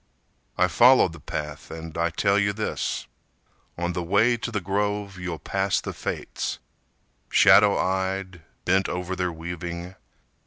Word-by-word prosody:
I 90 - +4
followed 120 -2 +5
the 85 - -11
path 75 +1 -6
and 80 0 -8
I 85 0 +1
tell 100 +3 +2
you 100 0 +1
this: 110 +1 -3 0.7
On 85 +1 -2
the 90 - -2
way 100 +8 +3
to 120 - -4
the 105 - -1
grove 100 0 -2
you'll 90 -2 -4
pass 95 +2 0
the - - -6
Fates, - - -4 0.7
Shadow 105 -1 +6
eyed, 95 -1 -2 0.2
bent 95 +1 +2
over 90 +1 -3
their 90 -1 -1
weaving. 85 +2 -6
95 Hz, 145 wpm, -25 LUFS, 85-100 Hz, 0.7 s, Shadow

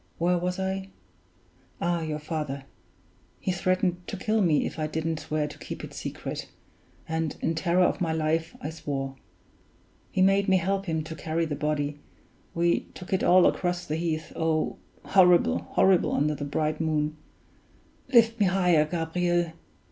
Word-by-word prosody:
Where 175 +1 +2
was 180 +1 -2
I? 190 0 -2 0.9
Ah, 170 0 0
your 155 -1 -2
father! 150 -3 -4 0.8
He 185 - -1
threatened 185 0 0
to 200 - -4
kill 215 +3 +1
me 165 -6 +3
if - - -5
I 155 - 0
didn't 160 0 -2
swear 155 -1 -1
to 150 - -11
keep - - -7
it - - -8
secret; - - -5 0.6
and 160 -1 -1
in 165 - 0
terror 175 +2 +2
of 180 - +1
my 165 -2 +1
life 160 +1 -1
I 150 - -4
swore. 135 -4 -4 1.0
He 185 - +2
made 195 +1 +3
me 190 - +5
help 195 +2 -1
him 160 -2 -1
to 160 +1 -7
carry 160 +1 -1
the 155 - -3
body 145 0 -1 0.6
we 170 0 +1
took 180 0 -7
it 190 - +1
all 185 0 +6
across 180 -1 0
the 150 - -2
heath 160 -1 -2
oh! 160 -1 0 0.3
horrible, 180 -2 +5
horrible, 190 -2 +3
under 150 +2 +2
the 145 -1 -4
bright 155 +2 -1
moon 155 -1 0 1.0
(lift 230 -2 +5
me 205 - +4
higher, 180 -4 +3
Gabriel). 175 +1 0
165 Hz, 165 wpm, -27 LUFS, 155-180 Hz, 1.0 s, all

